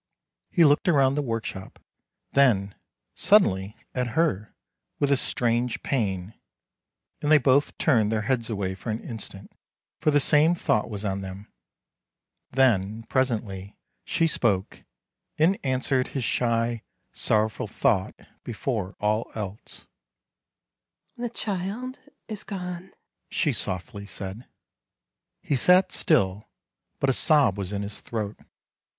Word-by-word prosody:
He 170 -3 +5
looked 145 +4 +4
around 135 -6 +4
the 145 - 0
workshop, 115 -6 -4 0.5
then, 105 -8 +3 0.4
suddenly, 100 - +3 0.2
at 125 0 -2
her, 110 - +1 0.4
with 140 -1 +1
a - - +6
strange 120 -2 -1
pain, 100 -6 -1 0.9
and 150 - 0
they 155 - +9
both 140 +1 +2
turned 110 -9 +3
their 110 -1 0
heads 120 -3 0
away 100 -4 -2
for 95 +5 -8
an 110 +1 -3
instant, 100 -4 -7 0.5
for - - +2
the 145 -1 +4
same 155 +4 +4
thought 110 -10 0
was 105 -1 -5
on 100 -1 -1
them. 95 +2 -9 1.0
Then, 110 -4 +2
presently, 110 -7 -1 0.3
she 170 -1 +1
spoke, 105 -11 0 0.5
and 170 +6 +3
answered 130 0 +1
his 135 - -3
shy, 115 0 0 0.3
sor 110 0 +2
rowful 110 - -6
thought 95 -2 +1 0.3
before 110 -4 -3
all 105 +2 0
else. 105 -1 -7 0.7
" - - -54
The 240 0 -2
child 220 +4 -3 0.3
is 215 -2 -5
gone," 180 -1 -6 0.4
she 150 -5 +1
softly 100 +1 -3
said. 100 +4 -7 1.0
He 145 - 0
sat 180 +8 +5
still, 100 - +1 0.5
but 135 - +3
a - - +1
sob 140 - +4
was 100 -2 -4
in 100 0 -2
his 100 0 -6
throat. 110 -3 -5
115 Hz, 130 wpm, -26 LUFS, 100-145 Hz, 1.0 s, they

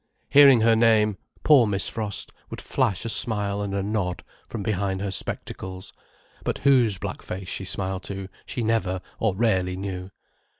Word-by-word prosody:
Hearing 140 -4 +8
her 115 0 +5
name, 110 -3 +3 0.2
poor 135 -7 +6
Miss 100 -2 -1
Frost 105 -4 -4 0.2
would - - -7
flash 95 +3 -1
a - - -1
smile 105 -3 -1
and 100 -1 -3
a 100 - -1
nod 100 -4 -2 0.3
from 110 -4 -5
behind 95 -2 -1
her 100 0 -3
spectacles, 95 0 -5 0.5
but - - -1
whose 125 -8 +4
black - - -5
face 95 -1 -6
she 95 - -4
smiled 95 0 -2
to 95 -1 -5 0.2
she 120 - -3
never, 110 -5 0 0.2
or 110 -4 +1
rarely 95 -4 +1
knew. 95 -1 -5
100 Hz, 165 wpm, -25 LUFS, 95-110 Hz, 0.5 s, Hearing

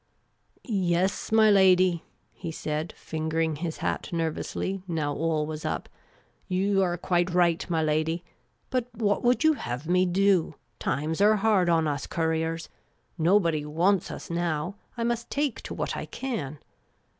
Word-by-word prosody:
" - - -37 0.3
Yes, 185 +5 0
my 220 -1 +6
lady," 185 -3 +5 0.3
he 165 - -6
said, 155 +1 -3
fingering 160 0 -2
his 165 +1 -4
hat - - -2
nervously, 170 +3 -2
now 155 -4 -1
all 155 0 0
was 155 0 -6
up. - - -3 0.3
" - - -35 0.2
You 195 +1 +2
are 175 -2 +1
quite 175 0 +1
right, 175 0 +2
my 165 -2 +1
lady. 155 +2 0 0.5
But 250 -2 0
what 205 -2 +1
would 245 +4 +3
you 315 0 +6
have 125 - -5
me 180 +1 +3
do? 185 -3 +2 0.2
Times 155 +5 -1
are 210 +1 +6
hard 200 -4 +3
on 165 -2 +3
us 145 -2 -2
couriers. 160 0 -1 0.5
Nobody 165 -3 +3
wants 175 +6 +1
us - - -7
now. 170 0 -1 0.2
I 230 - -1
must 235 0 -1
take 285 -3 -1
to - - -7
what - - -2
I - - -5
can." 165 - -4
170 Hz, 155 wpm, -27 LUFS, 160-195 Hz, 0.5 s, my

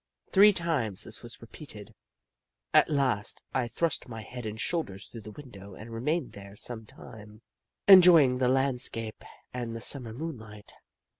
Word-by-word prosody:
Three 205 +2 +7
times 150 - -2
this 110 - -9
was 120 0 -6
repeated. 110 -4 -9 0.8
At - - +6
last, 130 -8 0
I 125 -2 0
thrust 160 +1 -2
my 110 -2 -7
head 125 +1 -8
and 110 +1 -6
shoulders 105 - -2
through 115 - -11
the 105 - -10
window 100 -6 -12
and 115 +2 -10
remained 145 +6 -2
there 100 0 -12
some 110 0 -7
time, 105 +1 -13 0.4
enjoying 170 -9 +8
the 125 -1 +2
land 130 -1 +1
scape 115 -1 -4 0.3
and 120 -2 -5
the - - -5
Summer 120 -1 +1
moonlight. 110 -7 -8
120 Hz, 155 wpm, -28 LUFS, 110-140 Hz, 0.8 s, enjoying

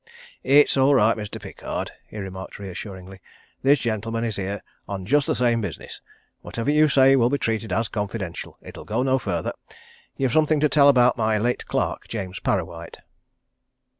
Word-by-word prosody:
"It's 145 0 +4
all 135 +1 +5
right, 115 -3 +4
Mr. 105 -2 -6
Pickard," - - -5 0.2
he - - -11
remarked 95 -1 -7
reassuringly. 95 -1 -8 0.4
"This 140 +2 +5
gentleman 115 -1 -2
is 115 -3 -2
here 100 +1 -4 0.3
on 95 -1 -5
just 145 +6 +2
the - - +1
same 120 -2 +2
business 100 -6 -6 0.4
whatever 115 +5 -2
you 150 +1 +4
say 135 -1 +6
will 120 -2 +3
be 145 - +1
treated 110 -4 -2
as 115 +5 +1
confidential 105 -4 -5
it'll - - -10
go 115 +4 -1
no 130 0 +2
further. - - -2 0.6
You've 130 -3 0
something 155 -1 +3
to 150 0 +3
tell 140 -1 +6
about 125 -3 +4
my 110 -1 +2
late 120 +3 -1
clerk, - - -2
James 95 -4 -5
Parrawhite." - - -3
115 Hz, 165 wpm, -23 LUFS, 100-135 Hz, 0.6 s, say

